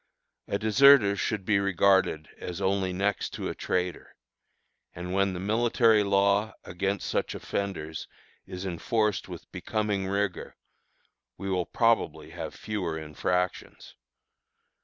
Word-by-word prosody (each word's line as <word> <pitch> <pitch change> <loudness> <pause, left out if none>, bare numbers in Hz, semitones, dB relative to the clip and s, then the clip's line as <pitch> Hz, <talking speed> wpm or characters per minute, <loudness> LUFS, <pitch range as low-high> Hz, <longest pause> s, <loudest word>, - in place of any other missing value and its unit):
A 100 - 0
deserter 110 -1 +6
should 100 0 -2
be 100 -1 +3
regarded 95 -5 +2
as 90 0 -6
only 95 -1 0
next 100 +2 -1
to - - -3
a - - -3
traitor, 90 -1 -3 0.8
and 90 +1 -5
when 100 0 +2
the 90 - -5
military 110 +2 +3
law 100 +1 +2
against 95 +3 -2
such - - -1
offenders 80 -6 -4 0.4
is 90 +1 -6
enforced 105 +3 -1
with - - -10
becoming 105 -3 -2
rigor, 100 -1 -2 0.8
we 95 0 -4
will 90 -2 0
probably 95 -10 +1
have - - -6
fewer 95 -7 -3
infractions. 90 +4 -3
100 Hz, 120 wpm, -28 LUFS, 90-105 Hz, 0.8 s, deserter